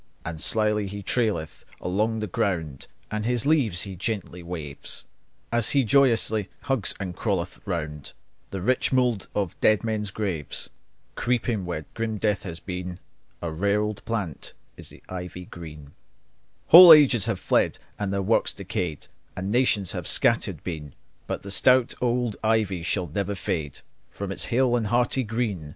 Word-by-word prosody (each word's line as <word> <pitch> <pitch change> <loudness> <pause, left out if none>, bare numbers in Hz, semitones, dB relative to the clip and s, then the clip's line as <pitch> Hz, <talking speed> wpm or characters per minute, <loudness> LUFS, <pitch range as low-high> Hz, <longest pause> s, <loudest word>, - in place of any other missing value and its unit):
And 80 -2 -5
slyly 105 0 +2
he 100 +1 -7
traileth 105 -9 -1 0.2
along 110 +5 -1
the - - -1
ground, 85 - -2 0.2
And 110 0 -2
his 120 +1 0
leaves 130 - +2
he 100 -2 -7
gently 95 -2 -4
waves, 80 -5 -4 0.5
And 120 0 +2
he 135 +5 +2
joyously 115 -4 +3 0.2
twines 135 -7 0
and 95 -3 -5
hugs 95 -5 -2
around 75 -6 -4 0.4
The 95 -2 -5
rich 130 +5 +1
mould 125 -5 +1
of 100 -5 -2
dead 110 0 +3
men's 110 -2 -2
graves. 95 -7 -3 0.4
Creeping 120 -5 -1
where 80 -4 -4
no 110 -1 -1
life 105 -2 0
is 85 -1 -6
seen, 90 -1 -5 0.5
A 85 - -2
rare 100 +6 +1
old 105 -1 -3
plant 105 -10 -4 0.2
is - - -10
the - - -16
ivy 90 0 -7
green. 75 -5 -10 0.8
Whole 175 +1 +12
ages 130 -9 +6
have 115 -4 -1
fled, - - +1 0.2
and 100 -2 -2
their 100 0 -1
works 110 +4 +2
decayed, 85 -5 -4 0.3
And 95 +2 -3
nations 110 -6 +2
have - - -5
scattered - - +2
been; 75 -5 -6 0.3
But - - -4
the 100 - -7
stout 125 +4 +4
old 120 -3 0
ivy 110 -5 +1
shall 90 +2 -1
never 100 +5 -3
fade 80 -6 -4 0.3
From 100 -1 -6
its - - -1
hale 125 0 +2
and 115 -3 0
hearty 120 +4 +1
green. 105 - -3
100 Hz, 160 wpm, -25 LUFS, 90-115 Hz, 0.8 s, Whole